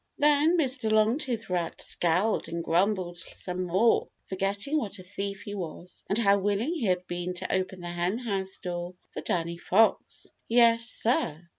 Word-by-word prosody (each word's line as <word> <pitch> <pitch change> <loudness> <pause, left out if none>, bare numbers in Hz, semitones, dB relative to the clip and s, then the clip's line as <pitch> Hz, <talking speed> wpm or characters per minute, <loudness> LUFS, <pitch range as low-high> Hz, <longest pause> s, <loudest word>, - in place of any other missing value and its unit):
Then 300 +3 +4
Mr. 255 -7 +1
Longtooth 225 +2 +1
Rat 175 -2 -2
scowled 180 +6 +1
and 170 0 -3
grumbled 175 0 +1 0.2
some 180 0 -4
more, 190 +7 +3 0.2
forgetting 200 +10 -1
what 205 -6 -5
a 185 - -10
thief 200 +1 -5
he 205 - -6
was 180 -2 -7
and 200 - +2
how 200 -3 +4
willing 205 - 0
he 315 -10 -2
had 180 -1 +1
been 175 0 -4
to - - -3
open 185 -1 -1
the 175 - -6
Henhouse 190 +2 -2
door 175 0 -5 0.2
for - - -5
Danny 170 0 -1
Fox. 215 +5 +1
Yes, 230 -1 +5
sir! 170 -10 -1
195 Hz, 160 wpm, -28 LUFS, 180-225 Hz, 0.2 s, Yes